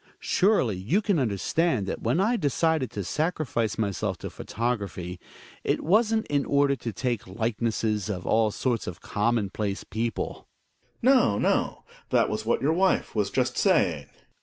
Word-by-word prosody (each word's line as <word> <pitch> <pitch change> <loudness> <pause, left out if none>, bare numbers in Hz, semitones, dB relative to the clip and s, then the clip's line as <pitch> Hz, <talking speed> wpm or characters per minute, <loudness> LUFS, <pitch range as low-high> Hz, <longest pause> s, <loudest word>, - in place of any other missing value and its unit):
Surely 185 - +2
you 110 - +1
can 200 -6 +1
understand 125 - 0
that 95 - -4
when 125 +9 +1
I 220 +6 +2
decided 160 - +1
to 100 - -4
sacrifice 145 - -1
myself 100 -3 -1
to - - -7
photography, 100 -6 -3 0.4
it - - 0
wasn't 220 +5 +3
in 145 -1 0
order 140 -1 +2
to 115 -2 -5
take 120 +1 -2
likenesses 110 0 -1
of 95 -3 -4
all 110 -1 +3
sorts 120 +2 -1
of 90 - -6
commonplace 105 -2 -1
people. 115 +1 -4 0.5
Gregers. 265 +3 +6
No, 110 - +3
no, - - 0 0.3
that - - +2
was 110 +1 -3
what 120 - +1
your 155 +3 +3
wife 190 +2 +1
was 105 -3 0
just - - 0
saying. - - +2
115 Hz, 155 wpm, -26 LUFS, 105-155 Hz, 0.5 s, Gregers